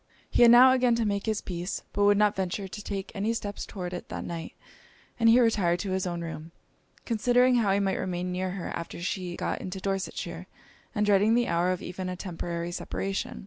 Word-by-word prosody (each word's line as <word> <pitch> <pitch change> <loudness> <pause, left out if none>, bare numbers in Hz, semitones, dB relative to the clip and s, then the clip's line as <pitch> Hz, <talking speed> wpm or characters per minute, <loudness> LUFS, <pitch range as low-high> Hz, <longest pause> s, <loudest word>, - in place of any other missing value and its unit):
He - - +2
had 240 - +9
now 250 +2 +9
again 250 -2 +3
to 230 -1 0
make 200 0 -1
his 215 -1 0
peace, 175 0 -4
but 205 0 +2
would 205 0 +5
not 210 0 +3
venture 190 +1 -2
to 210 +2 -8
take 195 -1 -5
any 215 +3 -1
steps 205 -2 -5
towards 180 -3 -6
it 175 - -7
that - - -5
night; 165 -1 -6 0.6
and 230 -1 +5
he 235 +2 +7
retired 205 -8 +3
to 195 - -3
his 185 0 -1
own 175 -1 -3
room, 165 -1 -7 0.5
considering 245 +2 +3
how 215 -4 +2
he 195 - +2
might 195 -1 0
remain 180 -1 -2
near 185 +1 -2
her 180 -1 -5
after 170 - -6
she 180 0 -3
got - - -3
into 190 +1 -5
Dorsetshire, 195 0 -4 0.5
and 210 0 +2
dreading 205 +2 +4
the 240 0 +2
hour 170 +2 +1
of 185 -1 -2
even 185 +1 -5
a 180 - -3
temporary 170 -2 -4
separation. 195 +2 -4
195 Hz, 215 wpm, -28 LUFS, 180-215 Hz, 0.6 s, had